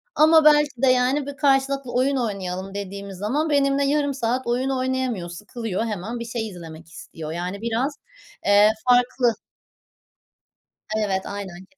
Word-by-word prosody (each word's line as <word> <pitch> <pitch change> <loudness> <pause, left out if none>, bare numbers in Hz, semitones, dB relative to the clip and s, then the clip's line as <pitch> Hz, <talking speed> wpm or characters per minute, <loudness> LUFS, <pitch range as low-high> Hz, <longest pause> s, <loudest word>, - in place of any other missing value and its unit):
ama 315 0 +6
belki 295 -4 +4
de 265 - +4
yani 255 +3 +2
bir 280 -1 -7
karşılıklı 275 -2 +1
oyun 270 +3 +2
oynayalım 195 -5 -3
dediğimiz 200 -1 -6
zaman 275 - -1
benimle 280 -1 +2
yarım 285 0 +1
saat 255 0 -2
oyun 250 +3 0
oynayamıyor 255 -8 -1
sıkılıyor 210 +3 -4
hemen. 220 +2 -4
Bir 235 - -5
şey 230 -1 -3
izlemek 165 -3 -11
istiyor 160 -1 -9
yani 180 +4 -4
biraz, 235 +5 -1 0.5
eee, 205 +1 +6 0.2
farklı. 245 -1 +3 1.7
Evet 190 -1 -2
aynen 190 -3 -7
ke 285 - -30
240 Hz, 145 wpm, -23 LUFS, 200-270 Hz, 1.7 s, ama